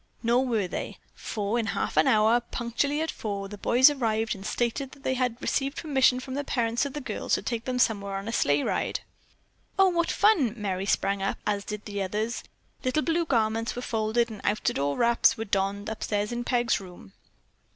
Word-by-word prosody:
Nor 245 +3 +3
were 220 -6 0
they, - - -5 0.2
for 210 +2 -2
in 225 - -1
a - - -1
half - - -2
hour, 215 +9 +4
punctually 240 +5 -2
at 320 - -1
four, 200 -2 -4
the 205 - -8
boys 250 +6 +6
arrived 225 -5 0
and 195 - -9
stated 240 +5 -2
that 275 - -16
they 260 - +1
had 250 -2 -1
received 275 +1 -1
permission 265 -5 +3
from 260 +1 -7
the 285 +2 -2
parents 235 0 0
of 275 - -9
the 295 - -4
girls 275 - -1
to - - -4
take 235 -2 -3
them 255 -1 -1
somewhere 200 -5 +1
on 195 +2 -5
a - - -2
sleigh 145 -9 +2
ride. - - -1 0.8
"Oh, 385 -1 +6
what 340 -1 0
fun!" 340 - +3
Merry 195 -2 -2
sprang 195 0 +1
up, 195 - -1
as 205 -1 0
did 210 0 -6
the 205 -1 -4
others. 215 +5 -2 0.4
Little 275 +4 +1
blue 335 0 +1
garments 225 -4 0
were 245 - -5
folded 225 +1 0
and 210 - -8
outdoor 145 -9 0
wraps 235 0 +4
were 225 - -3
donned 200 0 -1
upstairs 210 -1 -2
in 240 0 -3
Peg's 240 -2 +1
room. 180 - -12
230 Hz, 200 wpm, -27 LUFS, 205-255 Hz, 0.8 s, boys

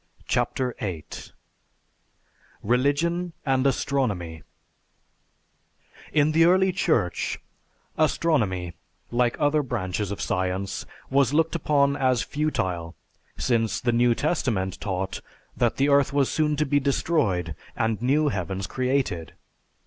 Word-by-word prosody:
CHAPTER 125 -2 0
VIII 90 -7 -4 1.6
RELIGION 145 - +1
AND 135 -1 +2
ASTRONOMY 100 - -1 1.7
In 150 0 +3
the 165 +1 +4
early 190 +2 +4
Church, 125 - 0 0.6
astronomy, 110 - +1 0.4
like 120 0 +1
other 150 0 +3
branches 105 - -3
of 100 - -5
science, 95 +1 -2 0.2
was 135 0 +3
looked 165 +1 +2
upon 145 -3 +2
as 130 -3 +2
futile, 90 - -2 0.4
since 115 -3 +1
the 120 - +1
New 120 0 +3
Testament 115 - -1
taught 95 -1 -3 0.3
that 120 -2 +1
the 140 +2 +2
earth 140 -1 +4
was 140 -2 +2
soon 150 -1 +1
to 150 +1 +1
be 145 0 +2
destroyed 130 - 0 0.2
and 110 -1 -1
new 145 +4 +2
heavens 95 -3 -3
created. 125 - -1
130 Hz, 110 wpm, -25 LUFS, 95-145 Hz, 1.7 s, the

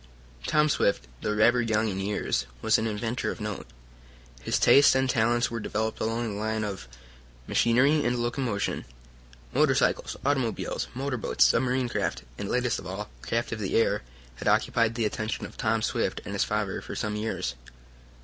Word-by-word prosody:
Tom 150 0 +4
Swift, 100 - +1
though - - -1
rather 120 +3 +4
young 110 -1 +1
in 95 -2 -2
years, 100 -9 -1
was - - +3
an 110 - -1
inventor 115 +3 -2
of - - -5
note. 105 -2 -5 0.7
His - - 0
tastes 140 -1 +6
and 130 0 +2
talents 120 -1 +2
were 115 - -3
developed 110 +1 -2
along 115 0 -1
the 100 - -5
line 110 0 -1
of 100 -8 -5 0.6
machinery 135 +6 +3
and 120 0 +1
locomotion. 120 -3 -1 0.7
Motorcycles, - - +2
automobiles, 135 -5 -1
motorboats, 125 - +1
submarine 125 - +2
craft, 120 - -2 0.2
and, 100 - -4
latest 125 -2 0
of - - -9
all, 105 +3 -5
craft 115 +1 -2
of 115 - -3
the 100 -3 -2
air, 115 - +3 0.4
had - - -5
occupied 115 -1 +2
the 115 -2 0
attention 110 +1 -2
of - - -10
Tom 110 0 0
Swift - - -1
and 100 - -5
his 100 - +2
father 105 -2 -2
for - - -7
some 105 -1 -2
years. 105 - -2
115 Hz, 170 wpm, -27 LUFS, 105-120 Hz, 0.7 s, tastes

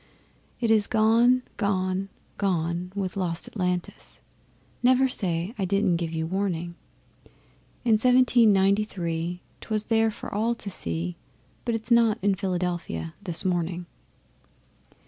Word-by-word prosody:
It 230 -2 +1
is 215 -2 +3
gone, 230 +3 +4
gone, 190 -2 -1 0.3
gone 175 -2 -1
with 190 -1 -3
lost 175 -4 -2
Atlantis 180 -3 -4 0.6
(Never 255 +2 +4
say 185 -5 -1
I 195 - +1
didn't 195 -2 +2
give 165 -1 -3
you 160 -1 -2
warning). 175 -2 -2 1.1
In 220 -3 +4
Seventeen 250 -2 +5
Ninety 200 +2 +3
three 175 -3 -4 0.2
'twas 215 -1 -1
there 225 0 +4
for 220 - -8
all 225 +3 +1
to 205 -3 -7
see, 85 - -3 0.5
But 235 -2 0
it's 225 +2 -6
not 230 -2 +5
in 200 -1 +3
Philadelphia 175 - -3
this 180 -2 -2
morning. 175 -1 -1
195 Hz, 125 wpm, -26 LUFS, 175-220 Hz, 1.1 s, Seventeen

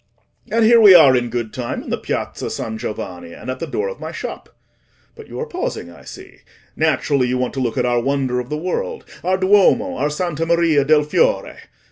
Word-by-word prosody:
And 230 0 +3
here 230 +1 +6
we 200 -4 +9
are 140 -6 +7
in 120 -1 0
good 115 -2 -4
time 125 -2 -4
in - - -8
the - - 0
Piazza - - -4
San 110 -1 -5
Giovanni, 90 -6 -6
and 130 - -7
at 130 - -6
the - - -4
door 430 +4 -2
of 485 - -7
my - - -6
shop. - - -7 0.7
But 445 - -12
you - - -8
are 465 - -2
pausing, 465 +3 -5
I - - -16
see: - - -12 0.4
naturally, 140 -4 +1
you 125 +1 -1
want 125 0 -2
to 135 - -4
look 125 -1 -2
at 125 - +1
our 120 -1 +1
wonder 135 -1 -1
of 125 0 -6
the 150 - -2
world, 460 - -4 0.2
our 185 +1 +1
Duomo, 205 +8 +3
our 145 - 0
Santa 165 0 -3
Maria 165 -4 +3
del 150 +1 +3
Fiore. - - 0
150 Hz, 215 wpm, -19 LUFS, 125-200 Hz, 0.7 s, we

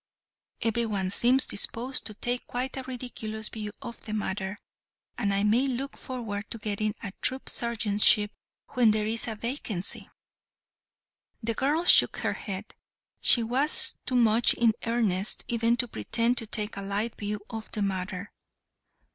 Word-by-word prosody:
Every 230 0 +1
one 195 -3 -1
seems 250 +5 +6
disposed 240 +5 -1
to 215 - -4
take 245 +3 -3
quite 255 +2 -3
a 265 - -3
ridiculous 235 -4 -5
view 210 -2 -5
of 235 - -8
the 215 - -4
matter, 200 -1 -3 0.6
and 205 -4 0
I 200 0 +1
may 230 +6 +3
look 270 +2 -3
forward 225 -6 -6
to - - -5
getting 215 0 -2
a 200 - -4
troop 260 +1 -2
sergeantship 210 -2 +2 0.4
when 245 -3 +4
there 215 0 +2
is 225 +2 0
a 220 - -3
vacancy." 220 -5 -4 1.3
The 230 +1 0
girl 290 +8 +1
shook - - +7
her - - -1
head. 195 0 -6 0.5
She 235 - +6
was 260 +6 +3
too 255 - 0
much 230 -1 +5
in 230 -2 +3
earnest 215 -5 +1
even 235 0 +1
to 245 - +5
pretend 230 - 0
to 225 - -3
take 210 -1 -3
a - - -3
light 205 +3 -2
view 210 0 -3
of 225 -1 -7
the 210 - -2
matter. 190 0 -3
225 Hz, 155 wpm, -28 LUFS, 205-240 Hz, 1.3 s, shook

